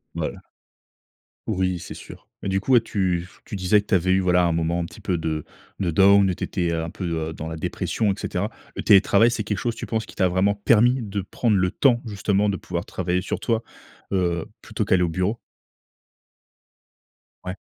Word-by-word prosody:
Voilà. - - -4 1.1
Oui, 95 -3 0
c'est - - -8
sûr, - - -12
mais 100 - -3
du 95 0 +1
coup, 130 - -3
ouais 120 -3 +7
tu 95 -6 0
f 90 - -15
tu - - -6
disais 95 +2 +3
que 105 - -6
tu - - -4
avais 95 0 +3
eu 95 - +3
voilà 90 -1 +3
un 85 - +2
moment 85 +1 0
un 85 - -1
petit 85 - -12
peu 90 - -1
de 80 -2 -3 0.3
de 90 -3 0
down 100 +3 +6
et 95 - +1
tu 90 - -6
étais 85 -3 -1
un 80 0 -2
peu, 95 - -8 0.3
heu, 80 - -6
dans 80 +1 -6
la 80 - -5
dépression 100 +6 -1
et - - -2
cetera. 100 +2 -2 0.3
Le - - -3
télétravail, 105 +2 +5
c'est 115 -3 -2
quelque 105 -2 -2
chose, 120 -2 -2
tu - - -6
penses, 110 -1 -2
qui - - -13
t'a 95 - +3
vraiment 95 +3 +2
permis 120 +4 +3
de 100 -2 -3
prendre 105 +3 0
le 90 0 +2
temps, 120 0 +3
justement, 100 0 +1
de 95 - -1
pouvoir - - -4
travailler 90 0 -1
sur - - -3
toi, 115 -1 0 0.5
heu, 85 -3 0 0.2
plutôt - - -3
qu'aller 90 -1 +3
au 85 - +1
bureau? 95 +7 -1 2.1
Ouais. 90 +1 -5
95 Hz, 215 wpm, -23 LUFS, 90-105 Hz, 2.1 s, ouais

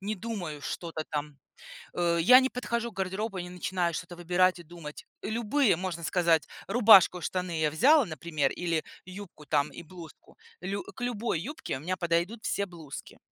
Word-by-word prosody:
не 205 +2 -3
думаю 180 -9 -5
что-то 165 -2 -4
там. 150 -1 -4 0.6
Э, 170 -1 +1
я 250 +9 +8
не 260 - +1
подхожу 235 -2 -3
к - - -25
гардеробу 195 +2 -3
и - - -2
не 180 - -9
начинаю 180 -1 -1
что-то 175 - -6
выбирать 180 +1 +2
и - - -9
думать. 165 -2 -10 0.2
Любые, 230 - +2
можно 175 -2 -4
сказать, 170 -2 +2 0.2
рубашку, 200 -5 +7
штаны 180 -2 -3
я 155 -1 +2
взяла, 280 - +5
например, 155 -2 -2
или 165 -3 -1 0.2
юбку 185 -5 -11
там 145 -1 +1
и 170 - -9
блузку. 170 -1 -13 0.2
Лю 195 +2 -3
к - - -13
любой 235 -8 -1
юбке 290 - -5
у - - -11
меня 185 +4 -2
подойдут 175 +6 -1
все 200 - -1
блузки. 160 -6 -10
180 Hz, 175 wpm, -29 LUFS, 165-205 Hz, 0.6 s, я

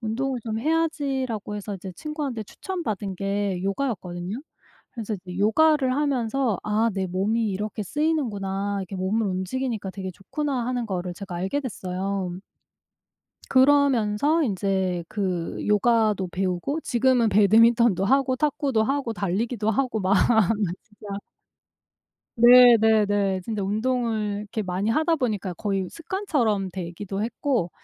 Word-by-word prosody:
'운동을 250 +4 -2
좀 220 -1 -2
해야지.'라고 275 -9 -1
해서 205 0 -5
이제 190 0 -7
친구한테 285 - -4
추천 370 - -6
받은 200 -4 -3
게 195 -1 -1
요가였거든요. 195 -4 -3 0.6
그래서 225 -3 -4
이제 180 -2 -9
요가를 265 +6 +3
하면서 265 -5 0
'아 215 +2 +1
내 190 -1 -1
몸이 210 +5 0
이렇게 210 +3 -3
쓰이는구나. 205 - -1
이렇게 195 +1 -7
몸을 200 +4 0
움직이니까 195 +3 -3
되게 190 -1 -6
좋구나.' 255 - -3
하는 245 -2 -2
거를 180 -3 -3
제가 190 -1 -8
알게 190 +10 -1
됐어요. 195 -5 -3 1.2
그러면서 275 +1 +3
인제 190 - -1
그 185 -5 -2
요가도 210 -2 +2
배우고 185 - -2
지금은 245 -1 +2
배드민턴도 215 0 +4
하고 265 +3 +2
탁구도 275 -4 +1
하고 270 -1 -1
달리기도 215 +3 -1
하고 245 0 0
막 190 +1 +2 0.7
진짜 205 -2 -8 1.2
네네네. 220 -5 +6
진짜 215 +1 -3
운동을 215 0 -1
이렇게 210 +1 -4
많이 185 +2 -2
하다 315 +8 +2
보니까 210 - -2
거의 195 -1 -2
습관처럼 285 - -1
되기도 190 +3 -5
했고 230 - -1
215 Hz, 310 characters per minute, -24 LUFS, 195-255 Hz, 1.2 s, 네네네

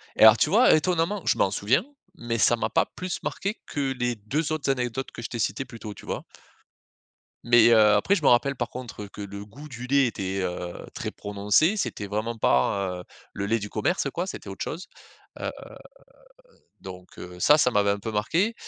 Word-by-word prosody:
Et - - -4
alors 110 0 +9
tu 150 - +2
vois 225 +7 +6
étonnamment, 175 +4 +1
je - - +2
m'en 95 - +2
souviens. 125 - +1 0.3
Mais 115 -1 -2
ça 115 +3 +4
m'a 110 -1 -2
pas - - +3
plus 185 -1 -5
marqué 200 +3 -4
que 140 -2 -2
les 120 0 0
2 140 +10 -2
autres 150 -3 0
anecdotes 125 0 -3
que - - -9
je - - -4
t'ai 120 - -5
citées 125 +4 -1
plus 125 -2 -11
tôt 105 -2 -7
tu - - -14
vois? - - -4 1.2
Mais, 120 -1 +6
heu, 115 - +7 0.2
après 105 - +3
je 165 - -3
me - - +4
rappelle 140 +3 +3
par 120 -1 -3
contre 120 -5 -8
que 100 - -10
le 100 0 -7
goût 140 +9 -12
du 125 -1 -7
lait 140 0 +4
était, 95 -3 -3
heu, 90 -1 -4 0.2
très - - -4
prononcé. 105 - +1
C'était 100 - -3
vraiment 110 +3 -3
pas, 90 +5 +1
heu, - - -12 0.3
le 100 - -3
lait 115 +2 +1
du 105 - -6
commerce 175 - 0
quoi, 175 - -2
c'était 145 - -7
autre 95 - -5
chose. 170 +5 -6 0.5
Heu, - - -3 1.3
donc, 90 -1 -11
heu, 90 0 -9
ça, 150 +10 +6
ça 125 -4 +3
m'avait 100 -1 +3
un 100 - -2
peu 110 +2 -5
marqué. 165 - +1
115 Hz, 210 wpm, -25 LUFS, 100-145 Hz, 1.3 s, alors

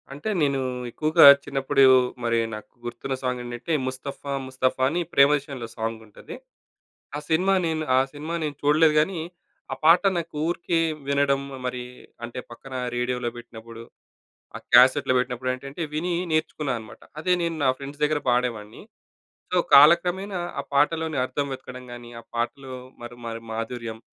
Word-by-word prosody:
అంటే, 145 +10 -5
నేనూ 140 -2 +1 0.3
ఎక్కువగా 155 +5 +4 0.2
చిన్నప్పుడు 135 0 +1 0.4
మరి 115 0 +1
నాకు 105 0 -9
గుర్తున్న 130 +2 -4
సాంగేంటంటే 125 +4 -3
ముస్తఫ్ఫా 140 +2 -5
ముస్తఫా 130 0 -1
అని 170 +4 -1
'ప్రేమదేశం‌లో' 140 -3 +2
సాంగుంటది. 110 -1 -6 0.8
ఆ - - -3
సినిమా 180 +5 +3
నేను 160 -1 -1
ఆ - - +6
సినిమా 150 +3 -6
నేను 150 -2 -3
చూడలేదు 150 +2 +4
గానీ, 170 +3 0 0.5
ఆ - - -4
పాట 165 +2 +7 0.2
నాకు 170 -2 -5
ఊరికే 170 0 -1 0.3
వినడం 140 -1 +2 0.2
మరి 125 0 -3 0.4
అంటే 120 +2 -7
పక్కన 130 +3 -11 0.2
రేడియోలో 125 0 -1
పెట్టినప్పుడు, 115 -1 -11 0.8
ఆ - - -9
క్యాసెట్‌లో 130 +1 +6
పెట్టినప్పుడేంటంటే 130 +4 -3
వినీ 175 +4 -1 0.2
నేర్చుకున్నా 155 -3 -1
అనమాట. 110 - -13 0.2
అదే 180 +3 +2
నేను 165 -1 -1
నా 130 - +4
ఫ్రెండ్స్ 140 +1 -9
దగ్గర 150 0 +2
పాడేవాడిని. 120 -4 -1 0.7
సో, - - +2 0.2
కాలక్రమేణా 175 +6 +5 0.2
ఆ - - 0
పాటలోని 160 +2 +1
అర్థం 135 +2 -2
వెతకడం‌గాని 125 -2 -10
ఆ - - -26
పాటలో 130 +3 -3 0.3
మరి 120 0 -9
మరి 115 0 -5
మాధుర్యం, 115 0 -5
135 Hz, 135 wpm, -24 LUFS, 120-155 Hz, 0.8 s, పాట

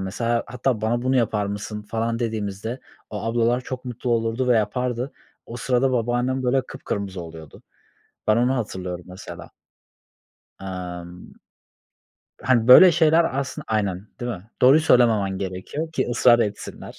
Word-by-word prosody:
mesela, 115 +5 -1
hatta, 125 -1 -1
"Bana 120 +3 0
bunu 130 +1 +1
yapar 105 -4 +1
mısın?" 105 +1 -5
falan 115 +2 -2
dediğimizde 110 +1 -4 0.3
o 105 -1 -5
ablalar 120 +2 +1
çok 130 0 -7
mutlu 125 0 -4
olurdu 115 +2 0
ve 120 - +5
yapardı. 125 +3 -1 0.3
O 115 - -7
sırada 125 +2 +1
babaannem, 125 +2 0
böyle, 130 +1 +2
kıpkırmızı 100 -3 -5
oluyordu. 80 -2 -12 0.7
Ben 110 - +4
onu 125 +2 +2
hatırlıyorum, 95 -6 -5
mesela. 90 +1 -10 1.1
Emm. 90 -2 -8 1.1
Hani, 120 -2 +2
böyle 175 +8 +10
şeyler 160 -3 +3
aslında 140 - -4
Aynen, 100 -2 -1
değil 120 - -3
mi? 100 +2 -11
Doğruyu 135 +5 +7
söylememen 110 -9 +3
gerekiyor 100 - -5
ki - - -1
ısrar 120 0 +5
etsinler. 105 -3 -4
115 Hz, 140 wpm, -23 LUFS, 100-125 Hz, 1.1 s, böyle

